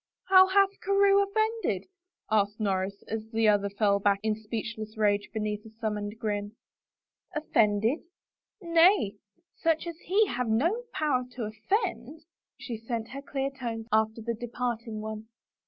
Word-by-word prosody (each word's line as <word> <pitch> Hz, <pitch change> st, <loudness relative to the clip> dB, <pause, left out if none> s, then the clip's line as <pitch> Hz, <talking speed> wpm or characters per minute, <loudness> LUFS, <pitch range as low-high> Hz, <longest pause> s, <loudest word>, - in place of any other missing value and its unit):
" -, -, -64 dB
How 375 Hz, 0 st, +9 dB
hath 395 Hz, +1 st, +3 dB
Carewe 395 Hz, 0 st, +4 dB
offended? 435 Hz, +3 st, 0 dB, 0.3 s
" -, -, -35 dB
asked 205 Hz, 0 st, +2 dB
Norris, 195 Hz, -1 st, -1 dB
as 220 Hz, 0 st, -4 dB
the 225 Hz, -1 st, +2 dB
other 205 Hz, -1 st, +3 dB
fell 200 Hz, 0 st, +2 dB
back 200 Hz, 0 st, +3 dB
in 220 Hz, -1 st, +2 dB
a 215 Hz, -, -8 dB
speechless 220 Hz, 0 st, -5 dB
rage 205 Hz, -1 st, +2 dB
beneath 210 Hz, -1 st, -3 dB
a 220 Hz, -, -12 dB
summoned 210 Hz, -1 st, -3 dB
grin. 205 Hz, -2 st, -3 dB, 0.8 s
"Offended? 225 Hz, -3 st, +2 dB, 0.6 s
Nay, 335 Hz, -, +4 dB, 0.4 s
such 325 Hz, -1 st, +1 dB
as 340 Hz, -1 st, -6 dB
he 410 Hz, +4 st, +3 dB
have 250 Hz, -, -2 dB
no 340 Hz, -, +1 dB
power 290 Hz, -5 st, +1 dB
to 245 Hz, -, -4 dB
offend!" 285 Hz, -, -2 dB, 0.4 s
She 250 Hz, -4 st, -6 dB
sent 225 Hz, 0 st, -4 dB
her 275 Hz, +1 st, -7 dB
clear 275 Hz, -1 st, -3 dB
tones 235 Hz, -4 st, -5 dB
after 220 Hz, +1 st, +1 dB
the 235 Hz, +1 st, -1 dB
departing 235 Hz, -1 st, -4 dB
one. 215 Hz, 0 st, -6 dB
225 Hz, 155 wpm, -28 LUFS, 215-315 Hz, 0.8 s, How